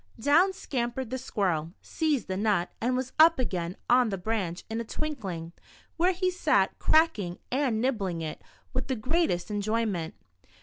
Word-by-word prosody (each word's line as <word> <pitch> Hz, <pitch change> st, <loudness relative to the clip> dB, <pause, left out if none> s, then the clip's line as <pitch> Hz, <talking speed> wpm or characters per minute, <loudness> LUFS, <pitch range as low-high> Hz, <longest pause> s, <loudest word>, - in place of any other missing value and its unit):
Down 325 Hz, -, +4 dB
scampered 250 Hz, -7 st, -3 dB
the 260 Hz, -, -2 dB
squirrel, 180 Hz, -9 st, -1 dB
seized 305 Hz, -7 st, -1 dB
the 185 Hz, -, -2 dB
nut, 200 Hz, -3 st, +1 dB
and 250 Hz, +2 st, +1 dB
was 260 Hz, 0 st, -3 dB
up 330 Hz, +1 st, +8 dB
again 180 Hz, -8 st, -2 dB
on 245 Hz, -1 st, +4 dB
the 195 Hz, -, -2 dB
branch 185 Hz, -3 st, -2 dB
in 225 Hz, +1 st, -3 dB
a -, -, -3 dB
twinkling, 200 Hz, -, -5 dB, 0.4 s
where 355 Hz, +3 st, +3 dB
he 370 Hz, 0 st, 0 dB
sat 360 Hz, -, +1 dB
crack 315 Hz, -7 st, +4 dB
ing 175 Hz, -3 st, -4 dB
and 255 Hz, -4 st, +1 dB
nibbling 200 Hz, -9 st, -1 dB
it, 155 Hz, -, -5 dB, 0.3 s
with 255 Hz, 0 st, -2 dB
the 265 Hz, -, 0 dB
greatest 225 Hz, -, 0 dB
enjoyment. 205 Hz, -5 st, -1 dB
230 Hz, 165 wpm, -28 LUFS, 190-275 Hz, 0.4 s, up